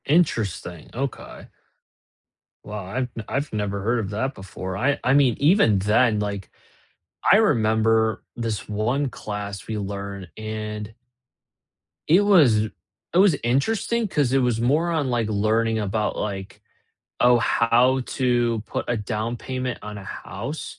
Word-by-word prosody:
Interesting, 110 - 0
okay. 135 +1 -5 1.2
Well, 105 0 -6
I've 120 +7 -3 0.2
I've 140 +2 -2
never 100 -1 -2
heard 120 +4 +1
of 100 -3 -3
that 130 +7 -2
before, 95 -1 -6
I 135 +7 +1
I 125 - +3
mean, 135 -5 +4
even 145 - +4
then, 105 +2 +3
like, 100 -2 -4 0.8
I - - +8
remember 110 - +2
this 115 -3 -3
1 120 +7 0
class 105 -4 -6
we 110 -1 -3
learn 100 -1 -5
and 110 0 -5 1.1
it 175 +6 +6
was 150 - +5 0.5
it - - +2
was 190 -4 +6
interesting 220 - +1
'cause 145 -9 +1
it 135 - +3
was 120 -2 +1
more 150 +8 +2
on, 155 -5 0
like, 120 -3 0
learning 110 +2 +1
about, 105 +1 -1
like, 95 -2 -5 0.6
oh, 120 0 +6
"How 120 +3 +3
to 120 -3 +1
put - - -3
a 120 - +1
down 110 +2 -3
payment 130 -1 -4
on 105 -1 -7
a 100 - -10
house?" 100 - -6
115 Hz, 140 wpm, -23 LUFS, 105-130 Hz, 1.2 s, I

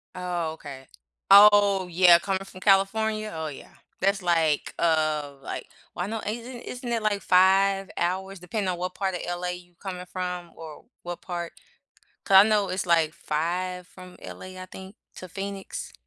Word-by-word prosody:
Oh, 175 -3 -3
okay. 140 -4 -11 0.4
Oh, 200 -2 +7
yeah, 175 0 +6
coming 195 +1 -2
from 185 - -12
California? 215 +2 +2
Oh, 160 0 -4
yeah. 145 - -10 0.3
That's, 195 +1 +1
like, 165 -4 +1
uh, 155 -3 +1
like, - - -6 0.3
well, 175 - -2
I - - -5
know 220 +1 -4
isn't 235 +3 -5
isn't 250 0 -7
it, 230 -1 0
like, 205 -2 0
5 195 +1 +3
hours 190 +2 -2
depending 185 +3 -3
on 180 - -2
what 180 +1 -4
part 190 -2 -2
of 175 - -4
LA 175 0 -3
you 180 0 -8
coming 180 -2 -6
from, 180 -1 -5
or 160 -2 -11 0.2
what 175 0 -6
part 175 -2 -5 0.7
'cause 195 - +4
I 205 +3 +8
know 210 -2 +2
it's, 185 0 -2
like, 165 -2 +3
5 175 +3 -3
from 185 -1 -14
LA, 185 0 -9
I 185 - -8
think, 190 +2 -11 0.2
to 185 - -9
Phoenix. 195 +1 -6
185 Hz, 170 wpm, -26 LUFS, 175-195 Hz, 0.7 s, I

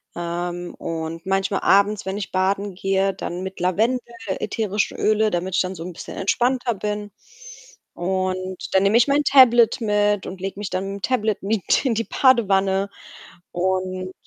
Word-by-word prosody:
Ähm. 175 +1 -4
Und 165 +1 -5
manchmal 195 +1 0
abends, 200 +1 +3
wenn 190 +1 -3
ich 205 - -6
baden 195 +1 0
gehe, 195 +1 0
dann 175 +1 -5
mit 190 0 -6
Lavendel, 220 +8 +1 0.4
ätherischen 210 -2 -1
Öle, 215 0 +2
damit 180 +1 -2
ich - - +3
dann 185 0 -2
so 165 -2 -8
'n 180 0 -7
bisschen - - -9
entspannter 240 +4 +1
bin. 210 0 -4 0.8
Und 185 +1 -2 0.2
dann 190 - +5
nehme 200 +3 +4
ich 235 - +4
mein 285 +1 +2
Tablet 240 -4 +5
mit 205 -2 +1
und 185 - -7
lege 195 +1 -5
mich 205 - -4
dann 185 +1 -2
mit'm - - -14
Tablet 215 -3 0
mit 205 - +1
in 240 -4 +1
die 230 - 0
Badewanne 200 -6 +2 0.6
und 185 +1 -2
195 Hz, 165 wpm, -22 LUFS, 185-215 Hz, 0.8 s, dann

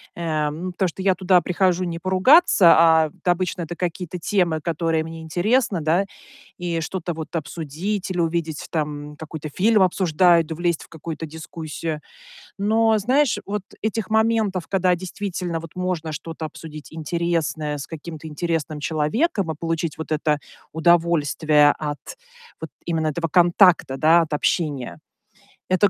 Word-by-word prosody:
э, 155 -3 -1
ну, 175 +5 -5
потому 185 -1 0
что 190 - -8
я 190 -1 +3
туда 185 0 +4
прихожу 180 +1 +1
не 170 -1 -4
поругаться, 190 - +6
а, 160 -1 +5
да 180 - +3
обычно, 180 +1 -2
это 170 +1 -5
какие-то 180 0 -3
темы, 175 -4 +1
которые 165 0 -1
мне 165 0 -8
интересны, 200 +6 +1
да. 165 +5 +2 0.5
И 170 -2 -2
что-то 175 +1 -4
вот 160 -1 -7
обсудить 165 +6 -4
или 180 - -2
увидеть, 165 -2 -1
там 150 -2 -3
какой-то 155 -1 -7
фильм 210 +7 +3
обсуждают, 170 -2 +3
влезть 170 0 -1
в - - -17
какую-то 160 0 -6
дискуссию. 160 0 -6 0.6
Но, 220 +2 +3
знаешь, 260 +5 +2
вот 205 0 -3 0.2
этих 215 -1 -2
моментов, 220 -5 +1
когда 185 -2 +2
действительно 180 -2 -4
вот 165 +1 -12
можно 180 -3 -2
что-то 160 +2 -6
обсудить 155 -1 -9
интересное 160 -2 -2
с 140 - -6
каким-то 160 0 -8
интересным 155 -1 -2
человеком 165 - 0
и - - -2
получить 165 0 -3
вот 160 0 -5
это 150 -1 +1 0.3
удовольствие 160 -3 +3
от 150 -1 -3 0.6
вот 160 - -5 0.2
именно 160 -2 -1
этого 165 +2 -1
контакта, 175 -3 +4
да, 160 +4 +5
от 155 -2 -3
общения- 140 - -1 0.7
это 185 +2 +4
170 Hz, 145 wpm, -22 LUFS, 155-185 Hz, 0.7 s, поругаться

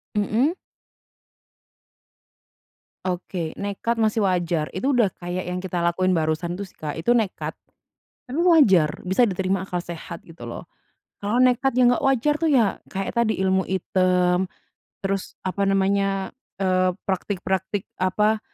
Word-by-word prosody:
Mhm. 225 +9 +2 2.5
Oke, 175 -2 -3
nekat 205 +4 -2
masih 220 0 +1
wajar. 175 -4 0
Itu 260 +10 +1
udah 240 -6 +4
kayak 175 +1 -4
yang 180 +1 -3
kita 180 -1 -2
lakuin 170 +2 +1
barusan 165 +2 -1
itu 200 - -4
sih, - - -23
Kak. 155 +1 -5
Itu 240 +9 +3
nekat, 220 -5 -1 0.7
tapi 270 +5 -2
wajar, 215 - +5 0.2
bisa 190 +7 +3
diterima 190 -3 +1
akal 180 -2 -3
sehat 170 -1 -8
gitu 165 0 -9
loh. - - -8 0.6
Kalau 210 +4 0
nekat 255 +1 +3
yang 245 -1 +6
nggak - - -2
wajar 270 +1 +3
tuh 325 - +3
ya, 235 -8 +2
kayak 195 0 -3
tadi, 235 -2 +1
ilmu 190 0 +2
item, 185 0 +2 0.6
terus, 195 0 -2
apa 195 +1 0
namanya, 195 0 +1 0.2
eee, 185 -1 +1
praktik-praktik 190 0 -2 0.2
apa, 210 +4 +2
190 Hz, 135 wpm, -23 LUFS, 180-220 Hz, 2.5 s, yang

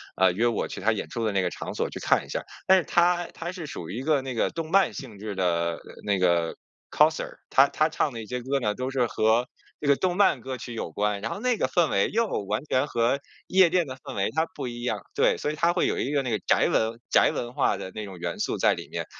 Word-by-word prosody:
呃， 95 -1 +4
约 115 +6 +2
我 115 -3 -1
去 - - -7
他 110 +4 +3
演 110 - -3
出 115 - -4
的 110 - +1
那 95 -1 +1
个 90 - -1
场 - - -6
所 - - 0
去 - - -6
看 - - +2
一 - - -17
下 - - -2
儿。 - - -11 0.2
但 190 0 +6
是 - - -2
他 175 +1 +2
他 170 +1 -6
是 175 -5 -7
属 85 -8 -7
于 105 - -5
一 - - -4
个 145 -1 +1
那 130 -1 -4
个 115 - +1
动 165 0 -5
漫 195 0 +4
性 115 -7 -8
质 105 -1 -5
的 85 -2 0 0.2
那 100 -2 +1
个 85 -2 +2 0.3
Coser， 155 +1 +2 0.2
他 135 +1 +6
他 155 +2 +1
唱 155 -2 0
的 115 -2 -6
一 - - -9
些 125 +3 -4
歌 135 +3 0
呢 105 -5 0
都 130 +4 -3
是 130 -2 +1
和 110 +2 +2 0.3
这 145 - -4
个 140 - +6
动 180 +4 -1
漫 190 -10 +4
歌 130 +1 -5
曲 120 0 -7
有 110 -7 -4
关， 105 +3 -1
然 115 - -3
后 - - -4
那 250 +1 +1
个 - - +1
氛 170 -4 +2
围 100 - +2
又 230 +1 +1 0.2
完 105 +7 -2
全 135 -1 +1
和 120 +1 +1 0.3
夜 185 -1 +5
店 175 -1 +2
的 130 -1 -7
氛 - - -9
围 100 0 0
它 160 +1 0
不 135 -3 -4
一 120 0 -6
样。 110 -5 -2
对， - - +3
所 150 - -2
以 - - -5
它 170 +3 +2
会 175 - +1
有 - - 0
一 135 - -1
个 145 -2 +1
那 125 - -2
个 110 - 0
宅 - - +4
文 110 +1 0
宅 - - +5
文 120 0 -4
化 - - +1
的 95 - -7
那 110 - -5
种 95 -3 -9
元 85 - -4
素 - - -1
在 - - +4
里 - - -8
面， - - -4
125 Hz, 315 characters per minute, -26 LUFS, 105-155 Hz, 0.3 s, 但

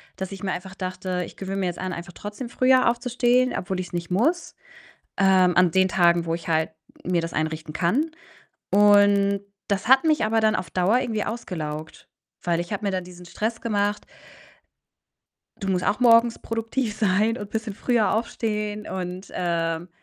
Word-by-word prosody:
dass 190 0 -5
ich 195 0 -8
mir 190 - -1
einfach 190 +1 -6
dachte: 185 -1 -3
„Ich - - -13
gewöhne 195 0 -4
mir 185 - 0
jetzt 175 - -4
an, 185 -1 -3
einfach 175 0 -8
trotzdem 210 +6 -7
früher 255 -1 +4
aufzustehen, 250 +1 +1
obwohl 185 0 -3
ich's 180 -1 -6
nicht 175 0 -4
muss, 310 - 0 0.6
ähm, 185 -2 +4
an 180 -2 +5
den 190 +2 +3
Tagen, 170 -2 +3
wo 165 - 0
ich 170 - -7
halt 160 0 +1 0.3
mir 175 -1 +1
das 165 0 -5
einrichten 155 0 -3
kann.“ 260 - +1 0.6
Und 200 -1 +5 0.3
das 200 +1 -1
hat 265 +3 +6
mich 310 -6 +3
aber 225 +1 +2
dann 215 0 +3
auf 170 - -3
Dauer 190 +8 +2
irgendwie 225 -5 -2
ausgelaugt, 155 -9 -6 0.4
weil 170 -1 +1
ich 175 +4 -5
habe 205 +1 -3
mir 200 - +1
da 185 -1 -1
diesen 180 0 -12
Stress 220 +6 -3
gemacht: 205 -2 -1 1.6
„Du 195 - -3
musst 180 -1 0
auch 210 - +1
morgens 230 -1 +5
produktiv 225 0 -3
sein 215 +3 +2
und 205 -1 -7
bisschen 220 -2 -3
früher 230 0 +1
aufstehen“, 210 -2 -2
und, 185 0 -5
ähm 170 -1 -1
195 Hz, 175 wpm, -24 LUFS, 180-225 Hz, 1.6 s, hat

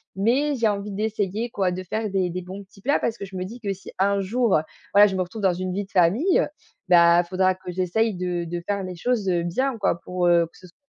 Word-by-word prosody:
mais 260 +9 +1
j'ai 230 -4 +2
envie 205 0 -3
d'essayer 215 +1 -2
quoi, 195 -6 0
de 185 +1 -4
faire 215 +3 -3
des 190 -2 0
des 180 +1 -4
bons 190 +3 -8
petits 195 0 -20
plats 280 +6 +2
parce 230 - -2
que - - -6
je 190 -1 -11
me 185 - -3
dis 230 +6 -8
que 200 -3 -2
si 190 - -12
un 200 0 +2
jour, 225 -1 +2 0.4
voilà, 205 +1 +8
je 190 - -3
me 185 - +1
retrouve 185 +5 -5
dans 190 -2 +3
une 185 +1 -3
vie 200 +1 -2
de - - -27
famille, 205 - +3 0.5
bah 170 0 +6
faudra 185 +1 +1
que 185 -1 -8
j'essaye 190 +5 0
de 180 -1 -2
de 170 +1 -5
faire 200 -1 -1
les 185 -1 -6
choses, 220 +2 -1
heu, 175 -2 +1
bien, 255 +9 -1
quoi, 195 -5 0
pour, 180 -1 -1
heu, 170 -1 +5
que - - -20
ce 185 - -14
soit 175 - -23
190 Hz, 260 wpm, -24 LUFS, 180-215 Hz, 0.5 s, voilà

